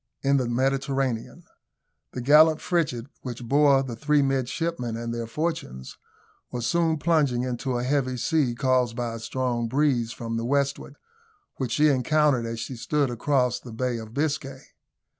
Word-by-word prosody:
IN 140 0 +3
THE 130 -3 0
MEDITERRANEAN. 135 -1 -1 0.7
The 125 - -4
gallant 155 +4 +6
frigate, 140 -10 -1 0.2
which 125 -1 -6
bore 140 +2 +4
the 125 -3 -6
three 145 +4 +2
midshipmen 135 -1 -2
and 115 0 -4
their 115 -1 -4
fortunes, 150 - -4 0.6
was 120 -1 -3
soon 165 +4 +1
plunging 145 -6 +1
into 125 0 -2
a 120 - -2
heavy 130 -1 0
sea, 135 -2 +1
caused 125 -2 +1
by 120 -1 -3
a 115 - -6
strong 120 0 -2
breeze 130 -3 +1
from 115 -1 -4
the 115 - -2
westward, 140 +1 -1 0.6
which 125 -4 -2
she 150 0 +4
encountered 140 -2 +2
as 115 0 -4
she 125 +2 -5
stood 140 +2 0
across 125 0 +1
the 120 - -11
Bay 120 0 -2
of 110 -1 -9
Biscay. 140 -1 -2
130 Hz, 160 wpm, -25 LUFS, 120-145 Hz, 0.7 s, gallant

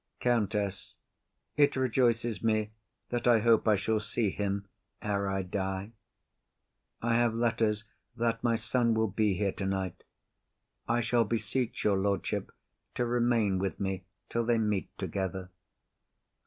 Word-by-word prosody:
COUNTESS. 105 -5 0 0.6
It 145 -1 +4
rejoices 120 -3 +1
me 110 -1 +1 0.4
that 120 0 -1
I 120 -1 +7
hope 115 0 +4
I 110 - +6
shall 110 +2 0
see 105 -1 -1
him 100 0 -2 0.3
ere 100 -1 -1
I 95 0 -1
die. 95 +2 -3 1.1
I 115 0 +2
have 120 -1 +2
letters 115 -2 +1 0.3
that 115 -1 0
my 115 -1 +3
son 120 0 +1
will 110 -1 +2
be 105 -1 +2
here 100 0 0
tonight. 95 -1 -3 0.8
I 120 +1 +2
shall 120 0 +3
beseech 115 +2 -2
your 100 -2 +3
lordship 100 -2 -1 0.4
to 125 - +1
remain 120 -5 +2
with 95 0 -2
me 95 -2 -2 0.2
till 115 - 0
they 115 0 +2
meet 105 -6 0
together. 95 -1 -3
110 Hz, 135 wpm, -30 LUFS, 100-120 Hz, 1.1 s, I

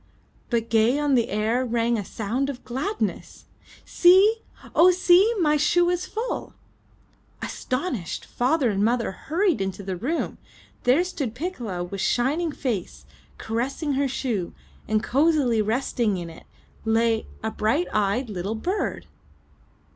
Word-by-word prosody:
But 230 -2 -1
gay 230 +4 +4
on 295 -1 +1
the 240 -3 +2
air, 220 +5 0
rang 235 -1 +1
a 210 - -2
sound 230 +8 -2
of 255 -3 -7
gladness. 365 - -3 0.4
"See! 380 +5 +5 0.4
Oh, 350 +3 +7
see! 365 +3 +5
My 300 -3 +3
shoe 350 +4 +3
is 355 +1 -2
full!" 460 +3 -4 0.9
Astonished, 255 - -3
father 255 -1 +1
and 200 0 0
mother 235 0 +1
hurried 325 - 0
into 195 +1 -3
the 190 -1 -3
room. 275 - -3 0.5
There 260 +8 +4
stood 280 -10 -4
Piccola 245 - -4
with 190 +2 -5
shining 285 - +1
face, 235 -11 -4 0.3
caressing 265 +6 -2
her 275 +1 +1
shoe, 235 -8 -3 0.3
and 215 0 +1
cozily 275 -5 +2
resting 220 -2 0
in 170 -2 -6
it, 160 - -15 0.4
lay 225 0 +1
— - - -25
a 220 - -1
bright 250 +13 +1
eyed 215 +5 +1
little 200 +1 -3
bird! 365 - -2
245 Hz, 140 wpm, -24 LUFS, 220-315 Hz, 0.9 s, Oh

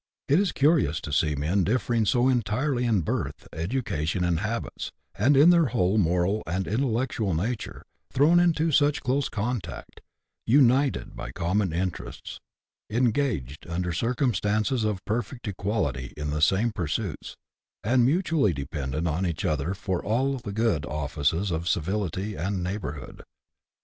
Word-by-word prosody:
It 145 +5 +4
is 200 -3 +1
curious 140 - +2
to 75 - -6
see 75 0 +2
men 80 +8 +1
differing 115 0 +1
so 125 +4 +3
entirely 125 +2 +1
in 110 -6 +2
birth, - - -3
education, 90 - -2
and 85 -2 +1
habits, 110 +4 -4 0.2
and 140 +2 +3
in 155 +5 +8
their 170 -3 +4
whole 95 -1 +1
moral 90 +3 +1
and 95 +4 -1
intellectual 115 - 0
nature, 110 +8 -3 0.3
thrown 155 +6 +5
into 165 -2 +2
such 145 0 +3
close 135 +1 0
contact, 110 -2 -4 0.5
united 135 +2 +3
by - - -6
common 90 +6 0
interests, 90 +2 -4 0.5
engaged 110 - 0
under 90 +1 -2
circumstances 115 - 0
of 105 -3 -2
perfect 120 +2 -3
equality 100 - -2
in 75 0 -3
the 75 0 -2
same 100 +9 +3
pursuits, 90 0 -3 0.5
and 120 +3 +3
mutually 150 - +2
dependent 70 +2 -3
on 80 +4 -1
each 85 -4 -2
other 75 +5 0
for 95 -2 -3
all 130 +5 0
the 105 - -6
good 105 -8 +1
offices 75 +5 -1
of 85 +1 -2
civility 95 +3 -1
and 95 +1 -2
neighbourhood. 90 -7 -5
105 Hz, 140 wpm, -26 LUFS, 85-125 Hz, 0.5 s, in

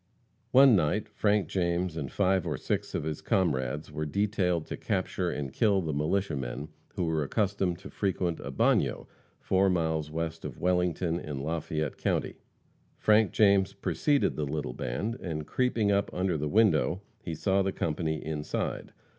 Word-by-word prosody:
One 135 -2 +7
night 95 +4 +1
Frank 105 -4 +1
James 85 -1 -1
and 70 -5 -4
five 95 -2 +1
or - - -1
six - - -2
of - - -1
his 75 -1 -4
comrades 75 -5 0
were 75 0 -3
detailed 95 -2 0
to - - -5
capture - - -1
and 70 -3 -4
kill 105 -4 +3
the 80 -4 -2
militia 80 +6 0
men 70 +3 -5 0.3
who 90 -4 0
were 80 -1 0
accustomed 95 +2 0
to 95 - -11
frequent 90 -4 -1
a 70 - -6
bagnio, 65 - +1 0.3
four 95 +1 +2
miles 80 -4 0
east 80 0 -3
of 70 -5 -6
Wellington, 90 -1 +1
in 75 -5 -5
Lafayette 80 -1 -2
county. - - -1 0.6
Frank 105 -2 +4
James 100 -2 +4
preceded 140 +8 +1
the 75 - -1
little 70 -3 -3
band, 105 - -3
and, 75 -4 -4
creeping 115 -3 +1
up 100 0 +1
under 90 -1 0
the 75 0 -2
window, 105 -2 +3 0.2
he 85 -5 -5
saw 95 +4 +2
the 95 0 0
company 80 -2 -2
inside. 75 -1 -3
85 Hz, 165 wpm, -29 LUFS, 75-100 Hz, 0.6 s, One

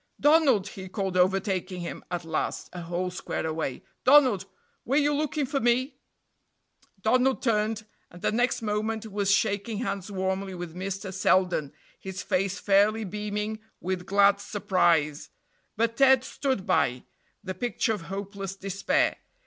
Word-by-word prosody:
"Donald," 285 - +4
he 190 -1 -9
called, 190 -2 -3
overtaking 185 0 +1
him 170 - -6
at 175 -1 -4
last, 160 -1 -3
a 180 - -6
whole 175 +2 -3
square 180 - -4
away 155 -5 -3 0.2
"Donald, 255 -9 +5 0.4
were 265 - -1
you 295 0 +3
looking 300 0 0
for 275 +1 -1
me?" 255 +3 +1 1.1
Donald 255 +3 +2
turned, 215 -2 0 0.2
and 175 - -14
the - - +2
next 240 +1 +1
moment 215 +1 -1
was 200 -1 0
shaking 200 +1 +1
hands 200 -4 -3
warmly 190 0 -2
with 175 -2 -6
Mr. 190 +2 -5
Selden, 180 -6 +2 0.3
his 190 -1 -6
face 195 +1 0
fairly 210 +2 +3
beaming 210 +2 -3 0.2
with 180 0 -3
glad 200 0 +5
surprise; 175 -8 +1 0.5
but 230 +1 0
Ted 265 -2 +6
stood 260 -8 -2
by, 125 0 +1 0.4
the 190 -2 -4
picture 225 +2 -1
of 210 - -5
hopeless 195 0 -5
despair. 195 0 0
200 Hz, 140 wpm, -27 LUFS, 185-225 Hz, 1.1 s, Ted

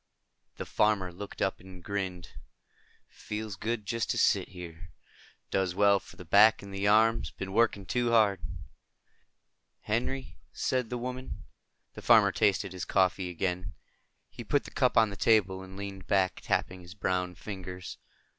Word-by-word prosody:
The - - -5
farmer 100 -4 +1
looked 100 +3 -5
up 95 - -1
and 90 -1 -13
grinned. 95 -4 -4 0.8
"Feels 105 -1 -6
good. 110 +2 -3
Just 115 +1 -2
to - - 0
sit - - +3
here. 90 -1 -10 0.6
Does 95 -2 0
well 100 0 +4
for - - -15
the 90 - -11
back 105 +6 +6
and 100 -1 -9
the 100 +1 -1
arms. 110 -3 +4
Been 95 +3 -7
working 110 -3 +2
too 120 +5 0
hard." 105 -5 +4 1.4
"Henry," 125 +5 -3 0.3
the 125 -1 -1
woman 125 +1 -5
said. - - -14
The - - -9
farmer - - +6
tasted 95 -1 +1
his 90 -2 -5
coffee 95 -1 +1
again. 90 +1 -3 0.6
He - - -8
put - - +1
the - - -11
cup - - +1
on 110 -2 +5
the - - -6
table 100 -4 +2
and 95 0 -11
leaned 100 -2 -7
back, 95 -1 +1
tapping 95 0 -1
his 90 +1 -12
browned 90 -3 -1
fingers. 95 -2 -7
100 Hz, 155 wpm, -29 LUFS, 90-110 Hz, 1.4 s, back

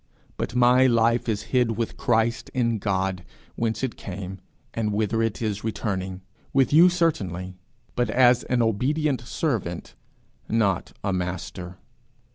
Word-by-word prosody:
but 120 - -4
my 125 +1 +5
life 115 0 +2
is 105 -2 -1
hid 120 -4 +2
with 115 -1 -2
Christ 115 -3 0
in 115 -3 +1
God, 95 -2 -1 0.3
whence 115 +2 -2
it 130 - -2
came, 95 0 -7 0.3
and 110 -2 -1
whither 110 +2 0
it 115 0 -1
is 105 -1 -2
returning 95 -4 -3 0.3
with 135 0 +3
you 170 +4 +8
certainly, 95 - -1 0.4
but 120 -2 0
as 125 +1 +5
an 125 -2 +1
obedient 130 +5 0
servant, 115 - -3 0.6
not 105 -5 +1
a 100 -1 0
master. 90 0 -4
115 Hz, 135 wpm, -25 LUFS, 95-125 Hz, 0.6 s, you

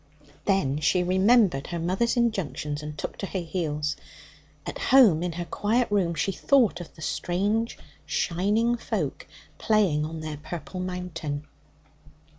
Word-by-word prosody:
Then 150 -8 +1
she 180 +3 +2
remembered 190 - +3
her 175 - -4
mother's 190 +9 0
injunctions, 150 - -1
and 150 0 -7
took - - -5
to 195 - -4
her 190 - -3
heels. 155 -3 -2 0.7
At - - -5
home 225 -12 +6
in 175 -1 -2
her 175 +1 -4
quiet 220 +6 0
room, 180 -5 +1
she 165 +6 0
thought 225 -3 +2
of 175 - -11
the 155 - -10
strange 200 +9 -1 0.3
shining 210 +7 +1
folk - - -3 0.3
playing 195 -9 +2
on 160 +1 -5
their 155 -1 -5
purple 165 +4 -7
mountain. 170 -5 -4
180 Hz, 140 wpm, -26 LUFS, 155-205 Hz, 0.7 s, home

